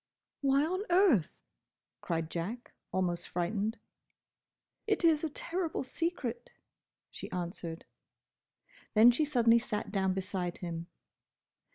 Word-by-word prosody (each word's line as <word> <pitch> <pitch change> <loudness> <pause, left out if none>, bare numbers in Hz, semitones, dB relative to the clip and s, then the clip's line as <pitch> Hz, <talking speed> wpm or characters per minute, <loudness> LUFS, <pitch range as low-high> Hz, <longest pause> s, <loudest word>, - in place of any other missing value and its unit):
"Why 275 +1 +3
on 370 +4 -1
earth—?" 345 - +4 0.6
cried 165 -1 -2
Jack, 225 - -4 0.2
almost 175 -2 -1
frightened. 200 +5 -1 1.1
"It 420 -4 +1
is 320 -2 +4
a 320 - 0
terrible 340 +2 -2
secret," 350 - -3 0.6
she - - -7
answered. 170 -2 -5 1.1
Then 225 +3 +9
she 275 +6 +1
suddenly 235 -5 +4
sat 215 -2 -4
down 190 -2 +1
beside 185 -2 -3
him. 170 -1 -5
225 Hz, 105 wpm, -32 LUFS, -, 1.1 s, Then